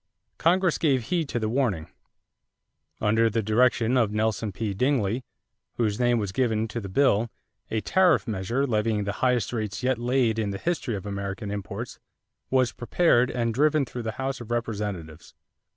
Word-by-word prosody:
Congress 180 Hz, 0 st, +3 dB
gave 135 Hz, -6 st, +2 dB
heed 165 Hz, -5 st, 0 dB
to -, -, -2 dB
the 110 Hz, -2 st, -1 dB
warning. 110 Hz, -, 0 dB, 1.1 s
Under 110 Hz, +2 st, +3 dB
the 110 Hz, +1 st, -1 dB
direction 120 Hz, +2 st, +3 dB
of 115 Hz, -4 st, +2 dB
Nelson 110 Hz, 0 st, 0 dB
P. 105 Hz, +1 st, -3 dB
Dingley, 125 Hz, 0 st, +1 dB, 0.5 s
whose 110 Hz, -2 st, 0 dB
name 120 Hz, -1 st, +3 dB
was 100 Hz, -4 st, -2 dB
given 115 Hz, -1 st, 0 dB
to 115 Hz, +2 st, -4 dB
the 100 Hz, -, -7 dB
bill, 115 Hz, 0 st, +3 dB, 0.4 s
a 110 Hz, -, -1 dB
tariff 185 Hz, -, +3 dB
measure 115 Hz, +6 st, -1 dB
levying 110 Hz, -3 st, 0 dB
the 100 Hz, -, -2 dB
highest 125 Hz, -2 st, +1 dB
rates 110 Hz, 0 st, -3 dB
yet 130 Hz, -2 st, +1 dB
laid 120 Hz, -2 st, +1 dB
in 105 Hz, -2 st, 0 dB
the 100 Hz, -, -3 dB
history 155 Hz, -, -2 dB
of 95 Hz, -, -6 dB
American 100 Hz, +1 st, -4 dB
imposts 105 Hz, +3 st, -6 dB, 0.5 s
was 130 Hz, -2 st, +2 dB
prepared 125 Hz, -1 st, +2 dB
and 115 Hz, -2 st, -1 dB
driven 150 Hz, +3 st, +3 dB
through 125 Hz, 0 st, -6 dB
the 110 Hz, -1 st, -3 dB
House 135 Hz, +1 st, -3 dB
of 120 Hz, -, -9 dB
Representatives. 105 Hz, -9 st, -4 dB
115 Hz, 170 wpm, -26 LUFS, 105-130 Hz, 1.1 s, Congress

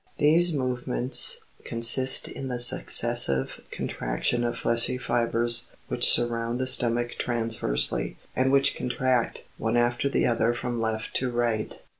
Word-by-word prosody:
These 170 Hz, +4 st, +2 dB
movements 125 Hz, -2 st, +2 dB, 0.2 s
consist 125 Hz, +3 st, +4 dB
in 135 Hz, -, -8 dB
the 125 Hz, -1 st, -5 dB
successive 70 Hz, -, +1 dB
con -, -, -6 dB
traction -, -, -3 dB
of 120 Hz, -, -3 dB
fleshy 115 Hz, +2 st, -1 dB
fibres 120 Hz, -1 st, +1 dB, 0.2 s
which -, -, +5 dB
surround 120 Hz, 0 st, +1 dB
the 130 Hz, -, -3 dB
stomach 120 Hz, -1 st, 0 dB
transversely, 65 Hz, -, -1 dB, 0.2 s
and 130 Hz, +1 st, 0 dB
which 140 Hz, 0 st, +2 dB
contract, 125 Hz, -1 st, -2 dB, 0.2 s
one -, -, -1 dB
after 120 Hz, +3 st, 0 dB
the -, -, -1 dB
other 115 Hz, 0 st, 0 dB
from 120 Hz, -1 st, -5 dB
left 110 Hz, -1 st, -4 dB
to 130 Hz, -, -3 dB
right. 120 Hz, -3 st, -3 dB
120 Hz, 135 wpm, -25 LUFS, 115-125 Hz, 0.2 s, which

